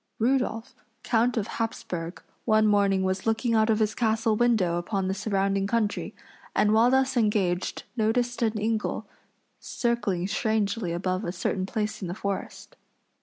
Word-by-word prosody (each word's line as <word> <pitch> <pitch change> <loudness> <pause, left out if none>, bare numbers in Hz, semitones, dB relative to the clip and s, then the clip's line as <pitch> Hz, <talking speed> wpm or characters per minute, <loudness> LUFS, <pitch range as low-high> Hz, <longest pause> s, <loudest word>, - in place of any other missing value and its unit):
Rudolph, 245 0 0 0.3
count 235 +1 +2
of 215 - 0
Hapsburg, 180 -6 -4 0.2
one 215 -1 +4
morning 200 -2 +3
was 190 +2 -1
looking 225 +1 +1
out 220 0 +3
of 220 - +3
his 215 -1 +1
castle 225 -1 +1
window 210 -7 +2
upon 190 +2 -2
the 190 - 0
surrounding 195 -1 0
country, 215 -1 -1 0.4
and 210 0 +3
while 225 +2 +5
thus 265 0 +2
engaged 205 -6 0
noticed 240 +2 0
an 220 -2 +1
eagle 220 0 -1 0.5
circling 235 -7 -1
strangely 215 -2 0
above 185 +3 -1
a 175 - -2
certain 185 +1 -2
place 215 +1 -3
in 185 - -3
the 175 - -4
forest. 200 -1 -5
215 Hz, 150 wpm, -26 LUFS, 195-230 Hz, 0.5 s, while